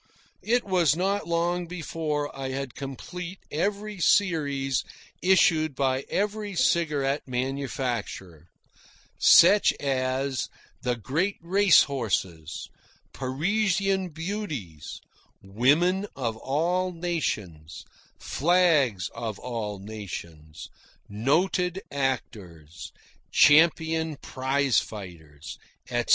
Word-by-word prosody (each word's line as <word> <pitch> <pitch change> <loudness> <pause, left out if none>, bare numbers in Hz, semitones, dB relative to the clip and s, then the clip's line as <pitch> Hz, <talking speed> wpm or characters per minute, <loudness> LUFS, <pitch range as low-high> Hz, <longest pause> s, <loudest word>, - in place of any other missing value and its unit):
It 240 +2 +1
was 175 -7 +3
not 195 +3 -1
long 170 +1 0
before 160 -4 -3
I 135 -1 -4
had 135 -2 -4
complete 175 - -7
every 200 +5 -2
series 145 - +2 0.4
issued 160 -5 +3
by 135 0 0
every 205 0 -2
cigarette 150 -6 +1
manufacturer 125 - -4 0.7
such 195 +5 +7
as 130 -1 -1 0.3
the 125 -1 0
Great 155 - -1
Race 185 +2 +5
Horses, 95 - -3 0.5
Parisian 190 +7 0
Beauties, 155 - -6 0.4
Women 150 - +2
of 115 -4 -2
All 175 +9 0
Nations, 105 - -4 0.3
Flags 150 - +2
of 110 -3 -5
All 115 -5 -4
Nations, 85 -7 -8 0.4
Noted 175 - 0
Actors, 100 - -4 0.4
Champion 160 +1 +4
Prize 130 -2 +1
Fighters, 85 -8 -9 0.3
etc. 120 0 -1
140 Hz, 85 wpm, -26 LUFS, 115-175 Hz, 0.7 s, such